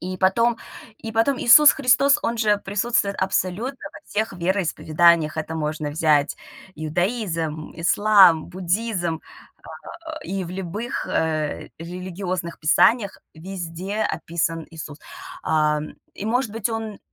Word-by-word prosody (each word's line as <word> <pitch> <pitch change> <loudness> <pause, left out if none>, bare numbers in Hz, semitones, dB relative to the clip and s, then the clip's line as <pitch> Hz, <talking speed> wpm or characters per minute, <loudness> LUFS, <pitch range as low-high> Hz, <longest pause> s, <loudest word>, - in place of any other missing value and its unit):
и 185 +2 -5
потом 230 +5 +2 0.4
и 225 -6 -7
потом 230 +4 +2
Иисус 295 +5 +8
Христос- 275 +1 +3
он 235 - -1
же 210 -2 +3
присутствует 200 +1 -1
абсолютно 190 +7 -2
во - - -12
всех 215 +2 -2
вероисповеданиях. 170 -3 +2
Это 155 +1 -4
можно 150 -1 -3
взять 150 -1 +2 0.4
иудаизм, 165 -1 -2
ислам, 185 -1 +5
буддизм, 180 -2 -2 1.0
э, - - -18
и 195 -1 -3
в 170 - -8
любых, 195 +6 -4
э, 155 -2 -1
религиозных 180 0 -5
писаниях 200 +7 +3 0.2
везде 185 +4 -5
описан 165 -4 -2
Иисус. 155 -2 -9 0.4
А, 150 -1 +1 0.3
и, 205 - -6
может 245 +1 0
быть, 225 -1 -2
он 225 -2 -5
185 Hz, 120 wpm, -23 LUFS, 160-220 Hz, 1.0 s, Иисус